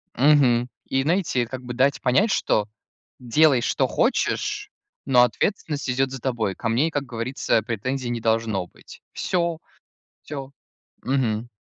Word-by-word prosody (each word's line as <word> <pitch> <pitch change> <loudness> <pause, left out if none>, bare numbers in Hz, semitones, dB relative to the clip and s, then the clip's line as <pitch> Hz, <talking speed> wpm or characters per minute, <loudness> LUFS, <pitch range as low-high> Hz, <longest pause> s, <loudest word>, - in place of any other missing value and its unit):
Мгм. 125 -3 +4 0.2
И 135 0 0
найти- 165 -3 0
это 120 -1 -1
как 130 -1 -5
бы 125 -1 -6
дать 135 +3 +2
понять, 190 - +3
что 105 - +1 0.5
делай, 130 +1 +3
что - - +1
хочешь, - - 0 0.3
но 125 -2 +5
ответственность 145 - -1
идет 130 +1 +1
за 135 - -6
тобой. 115 -6 -2
Ко 115 - -3
мне 130 +8 +2
и, - - -4
как 145 -2 -1
говорится, 120 -1 -1
претензий 120 +4 -3
не 120 -1 -3
должно 110 -5 0
быть. - - -16
Всё 170 -3 -1 0.6
всё. 135 -3 -7 0.5
Мгм. 120 -3 0
130 Hz, 150 wpm, -23 LUFS, 115-140 Hz, 0.6 s, но